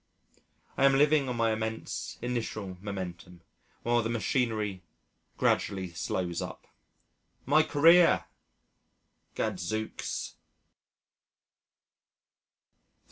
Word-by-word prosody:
I 135 - +4
am 135 0 +5
living 145 -1 +4
on 125 - -2
my 115 -1 +2
immense 110 0 -4
initial 110 -6 -3
momentum 90 -3 -6 0.4
while 120 0 +2
the 115 - -2
machinery 110 -4 -1 0.6
gradually 95 -4 0
slows 85 0 -2
up. - - -7 0.8
My 150 +4 +5
career! 165 +3 +5 1.1
Gadzooks. 110 +5 -3
110 Hz, 80 wpm, -29 LUFS, 95-135 Hz, 1.1 s, am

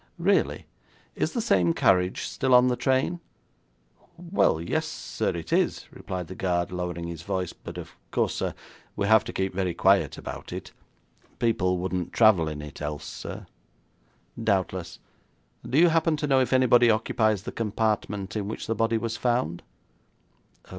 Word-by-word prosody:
'Really? - - +1 0.5
Is - - -1
the 240 - -1
same 90 - +2
carriage 90 0 +2
still 130 -2 +1
on 125 +1 +6
the 125 - +1
train?' 135 +7 +1 1.0
'Well, 170 - +1
yes, 85 - -1
sir, - - -3
it 85 -1 -4
is,' - - +1
replied 90 -1 -5
the 95 - -8
guard, 90 -1 -1
lowering 90 -1 -4
his 85 -2 -6
voice, 90 +1 -3
'but - - -10
of - - -8 0.2
course, - - 0
sir, - - -3 0.4
we 100 - -1
have 110 +2 +5
to - - -5
keep 95 0 -2
very 90 -2 -1
quiet 95 +3 +3
about - - -8
it. - - -7 0.7
People 90 -6 +1
wouldn't 90 -1 -3
travel 105 -8 +5
in 75 -1 -5
it, 75 0 -10
else, 75 0 -4
sir.' - - -7 1.0
'Doubtless. 95 -4 -1 0.7
Do 130 - -1
you 170 +2 +7
happen 165 -1 +2
to 150 - -2
know 135 -2 +3
if 130 - 0
anybody 125 -2 +5
occupies 110 -2 +1
the - - -5
compartment 105 -2 -2
in 105 -2 -2
which 110 - -5
the 115 - -1
body 115 +1 +1
was 115 0 -3
found?' 120 -9 0
100 Hz, 160 wpm, -26 LUFS, 90-120 Hz, 1.0 s, you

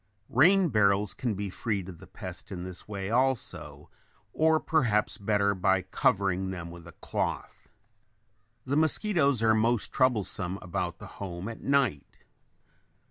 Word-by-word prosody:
Rain 180 +8 +5
barrels 100 -3 +3
can 115 0 -2
be 100 0 -4
freed 100 -3 -2
of 90 -4 -10
the - - -13
pest - - -9
in 90 -2 -5
this 90 -1 -8
way 100 -1 -4
also, 110 - -1 0.4
or 160 0 +3
perhaps 115 -12 +1
better 100 0 +2
by 95 0 +1
covering 95 -1 +1
them 85 -3 -6
with 85 -1 -12
a 85 - -12
cloth. - - -4 1.0
The 135 +2 -1
mosquitoes 155 - +2
are 110 0 +5
most 115 +1 +1
troublesome 105 -7 0
about 85 -1 -3
the - - -10 0.2
home 90 -1 -5
at 115 - -7
night. 140 - 0
100 Hz, 140 wpm, -28 LUFS, 95-130 Hz, 1.0 s, Rain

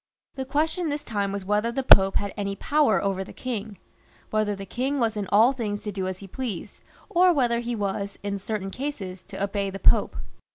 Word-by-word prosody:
The 265 -1 -4
question 315 +5 0
this 290 0 -3
time 200 -3 -2
was 200 -1 -4
whether 210 +3 +1
the 270 +3 -2
Pope 195 -5 +7
had 200 -1 -1
any 200 -1 -2
power 290 +2 +2
over 195 -1 0
the - - -11
king; 220 -5 -5 0.5
whether 215 -1 +1
the 195 0 -7
king 265 +7 -1
was 225 -2 +1
in 205 -2 -3
all 220 +5 +6
things 215 -6 -3
to 210 - -3
do 190 -1 -3
as 185 -1 -3
he 195 - -10
pleased, 210 -3 -5 0.3
or 365 -2 +5
whether 245 -7 +2
he 240 0 -3
was, 200 -1 -3
in 200 -1 -2
certain 195 -1 -4
cases, 195 -10 -5
to - - -5
obey 200 0 -1
the 195 - -6
Pope. - - +3
210 Hz, 210 wpm, -25 LUFS, 195-255 Hz, 0.5 s, Pope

